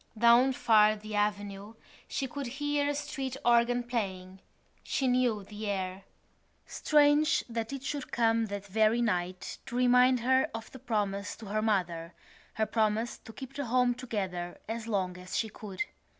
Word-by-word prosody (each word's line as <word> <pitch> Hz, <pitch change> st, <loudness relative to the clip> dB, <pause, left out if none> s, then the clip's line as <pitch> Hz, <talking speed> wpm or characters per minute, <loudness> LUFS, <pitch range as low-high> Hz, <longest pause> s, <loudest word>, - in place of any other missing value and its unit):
Down 235 Hz, +3 st, +6 dB
far 215 Hz, -4 st, +5 dB
in 215 Hz, -, -9 dB
the 215 Hz, 0 st, -8 dB
avenue 205 Hz, 0 st, -2 dB, 0.3 s
she 275 Hz, -, -2 dB
could 280 Hz, +1 st, -5 dB
hear 290 Hz, +3 st, -1 dB
a 290 Hz, -, -1 dB
street 270 Hz, -2 st, -4 dB
organ 240 Hz, +1 st, +4 dB
playing. 190 Hz, -6 st, -4 dB, 0.4 s
She 270 Hz, -, -1 dB
knew 245 Hz, -4 st, +2 dB
the 210 Hz, +2 st, -7 dB
air. 190 Hz, -1 st, -3 dB, 0.6 s
Strange 300 Hz, +1 st, +3 dB
that 230 Hz, -1 st, -4 dB
it 275 Hz, -1 st, -5 dB
should 285 Hz, -1 st, -4 dB
come 230 Hz, -1 st, +2 dB
that 200 Hz, -1 st, -5 dB
very 215 Hz, +3 st, +2 dB
night 180 Hz, -5 st, -2 dB
to 240 Hz, -, -6 dB
remind 250 Hz, 0 st, +5 dB
her 260 Hz, +2 st, +3 dB
of 225 Hz, 0 st, -7 dB
the 260 Hz, -, -10 dB
promise 205 Hz, -5 st, -2 dB
to 225 Hz, -, -11 dB
her 215 Hz, +2 st, -1 dB
mother, 180 Hz, -6 st, -1 dB, 0.4 s
her 220 Hz, -, +1 dB
promise 220 Hz, +1 st, 0 dB
to -, -, -12 dB
keep 265 Hz, +3 st, -9 dB
the 285 Hz, 0 st, -3 dB
home 250 Hz, +1 st, +3 dB
together 190 Hz, -8 st, -4 dB
as 225 Hz, +1 st, -4 dB
long 185 Hz, -4 st, -1 dB
as 180 Hz, 0 st, -5 dB
she 220 Hz, -, 0 dB
could. 205 Hz, +2 st, -5 dB
225 Hz, 165 wpm, -30 LUFS, 205-250 Hz, 0.6 s, Down